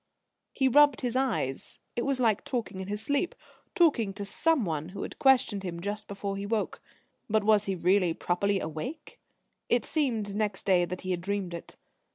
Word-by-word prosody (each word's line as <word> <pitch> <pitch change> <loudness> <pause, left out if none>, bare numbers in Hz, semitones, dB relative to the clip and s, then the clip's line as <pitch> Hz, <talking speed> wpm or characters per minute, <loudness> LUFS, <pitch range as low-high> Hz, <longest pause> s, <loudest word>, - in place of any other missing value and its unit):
He 265 - +2
rubbed 290 0 +5
his 250 -2 -2
eyes. 225 - -1 0.2
It 240 - -1
was 275 -2 +1
like 225 -5 +2
talking 220 -7 -3
in 190 - -6
his 205 +1 -3
sleep, 285 +8 0 0.4
talking 240 - +3
to 200 +1 -5
Someone 195 - 0
who 190 - -6
had - - -8
questioned 260 -7 +4
him 175 -3 -5
just 205 +4 -4
before 200 0 -4
he 200 - -4
woke. 220 -1 -2 0.5
But 215 0 +2
was 210 -1 +4
he 195 - -1
really 180 -1 +2
properly 195 +3 0
awake? 175 - -6 0.5
It - - +2
seemed 230 -10 -1
next 210 -1 -2
day 180 -3 +4
that 180 +1 -6
he 185 - -3
had 175 -1 -1
dreamed 195 -1 -2
it. 170 - -8
205 Hz, 185 wpm, -29 LUFS, 185-245 Hz, 0.5 s, rubbed